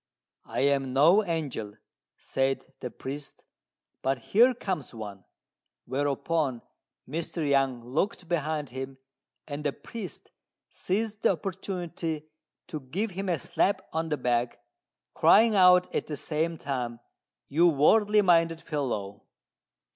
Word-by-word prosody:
"I -, -, -2 dB
am 135 Hz, -2 st, +2 dB
no 165 Hz, +10 st, +6 dB
angel," 145 Hz, -, -3 dB, 0.4 s
said 135 Hz, 0 st, -1 dB
the 125 Hz, -, -4 dB
priest, 140 Hz, +4 st, -7 dB, 0.6 s
"but 135 Hz, 0 st, +1 dB
here 235 Hz, -, +4 dB
comes 185 Hz, -, -4 dB
one;" 100 Hz, -4 st, -8 dB, 0.6 s
whereupon 140 Hz, 0 st, -1 dB, 0.4 s
Mr. 160 Hz, +1 st, -3 dB
Yang 135 Hz, -4 st, +1 dB
looked 180 Hz, -, -1 dB
behind 155 Hz, -4 st, -1 dB
him, 130 Hz, +1 st, -6 dB, 0.5 s
and 145 Hz, 0 st, -5 dB
the 145 Hz, -, +1 dB
priest 220 Hz, -5 st, -8 dB, 0.4 s
seized 215 Hz, +3 st, -2 dB
the -, -, +4 dB
opportunity 175 Hz, -3 st, -4 dB, 0.4 s
to 155 Hz, -, -5 dB
give 185 Hz, +11 st, -3 dB
him 190 Hz, +1 st, -4 dB
a 170 Hz, -, +2 dB
slap 190 Hz, +8 st, 0 dB
on 160 Hz, 0 st, -1 dB
the 150 Hz, -, 0 dB
back, 120 Hz, -1 st, 0 dB, 0.6 s
crying 220 Hz, +1 st, +5 dB
out 180 Hz, -1 st, +6 dB
at -, -, -1 dB
the 150 Hz, -, -3 dB
same 160 Hz, +3 st, -1 dB
time, 125 Hz, -5 st, -3 dB, 0.5 s
"You 165 Hz, +5 st, +4 dB
worldly 210 Hz, +8 st, +4 dB
minded 165 Hz, -2 st, +4 dB
fellow!" 110 Hz, -11 st, -3 dB
155 Hz, 125 wpm, -28 LUFS, 135-180 Hz, 0.6 s, no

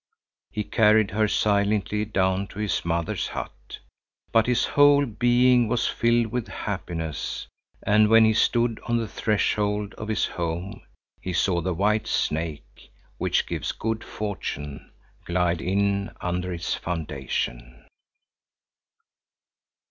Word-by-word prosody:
He 105 Hz, -, -3 dB
carried 105 Hz, 0 st, +3 dB
her 110 Hz, +1 st, +2 dB
silently 105 Hz, 0 st, +1 dB
down 95 Hz, -2 st, 0 dB
to 100 Hz, -, -14 dB
his 105 Hz, -4 st, -1 dB
mother's 85 Hz, 0 st, -1 dB
hut. -, -, -7 dB, 0.5 s
But 115 Hz, -1 st, +4 dB
his 125 Hz, -1 st, +2 dB
whole 145 Hz, 0 st, +5 dB
being 120 Hz, +1 st, +3 dB
was 120 Hz, +1 st, 0 dB
filled 115 Hz, -1 st, +1 dB
with 125 Hz, -2 st, -2 dB
happiness, 85 Hz, -6 st, -4 dB, 0.4 s
and 105 Hz, +1 st, +4 dB
when 115 Hz, 0 st, +7 dB
he 110 Hz, -, +4 dB
stood 115 Hz, 0 st, +2 dB
on 120 Hz, 0 st, +2 dB
the 115 Hz, -1 st, -2 dB
threshold 105 Hz, -1 st, 0 dB
of 105 Hz, -, -5 dB
his 110 Hz, -, +1 dB
home, 85 Hz, +2 st, -4 dB, 0.4 s
he 90 Hz, -, -4 dB
saw 85 Hz, 0 st, +1 dB
the 90 Hz, +1 st, -2 dB
white 105 Hz, +4 st, +1 dB
snake, 75 Hz, -6 st, -3 dB, 0.3 s
which -, -, +1 dB
gives -, -, -3 dB
good 110 Hz, 0 st, -3 dB
fortune, 75 Hz, -9 st, -5 dB, 0.3 s
glide 85 Hz, -1 st, 0 dB
in 100 Hz, +2 st, 0 dB
under 90 Hz, +1 st, -2 dB
its 85 Hz, -1 st, -2 dB
foundation. 65 Hz, -7 st, -4 dB
100 Hz, 125 wpm, -25 LUFS, 85-110 Hz, 0.5 s, when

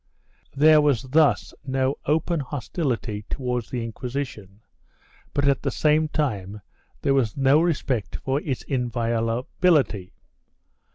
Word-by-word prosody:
3 140 Hz, -, -7 dB
There 155 Hz, 0 st, +7 dB
was 145 Hz, -6 st, +2 dB
thus 135 Hz, -3 st, +2 dB
no 130 Hz, 0 st, 0 dB
open 160 Hz, +2 st, +1 dB
hostility 125 Hz, -, -3 dB
towards 125 Hz, -4 st, -3 dB
the 120 Hz, -2 st, -3 dB
Inquisition, 115 Hz, -4 st, -6 dB, 0.7 s
but, 140 Hz, 0 st, +1 dB
at 140 Hz, -1 st, +2 dB
the -, -, -1 dB
same 155 Hz, +1 st, +2 dB
time, 105 Hz, -10 st, -2 dB, 0.4 s
there 140 Hz, -, +3 dB
was 125 Hz, -5 st, +1 dB
no 135 Hz, +3 st, +4 dB
respect 140 Hz, -, -1 dB
for 135 Hz, +2 st, -2 dB
its 135 Hz, -6 st, -3 dB
inviolability. 120 Hz, -, 0 dB
130 Hz, 120 wpm, -24 LUFS, 115-145 Hz, 0.7 s, There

